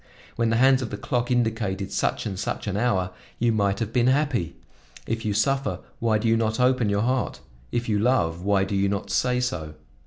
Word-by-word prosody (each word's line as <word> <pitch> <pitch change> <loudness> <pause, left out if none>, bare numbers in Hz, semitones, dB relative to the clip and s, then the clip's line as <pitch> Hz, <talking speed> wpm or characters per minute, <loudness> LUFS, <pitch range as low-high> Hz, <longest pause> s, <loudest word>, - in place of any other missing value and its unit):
When 115 -1 +1
the 115 - +2
hands 130 +2 +5
of 120 - -3
the 105 - -5
clock 120 +3 -1
indicated 110 -5 0
such - - -1
and 95 -3 -4
such - - -3
an 100 -2 -2
hour, 100 -5 +1 0.3
you 120 0 +2
might 100 -2 +1
have 115 0 -3
been 120 0 +3
happy. 130 - +1 0.5
If 115 0 -3
you 105 -2 0
suffer, 135 -2 +1 0.2
why 115 -2 +2
do 105 - -1
you 115 - +4
not 110 0 0
open 125 -3 +3
your 100 +1 +1
heart? 130 +1 -1 0.3
If 120 0 -1
you 105 -2 +1
love, 100 -8 +1
why 100 0 +2
do 100 +1 -2
you 100 0 +2
not 100 0 -3
say 125 +3 +1
so? 80 -11 -3
110 Hz, 215 wpm, -25 LUFS, 100-125 Hz, 0.5 s, hands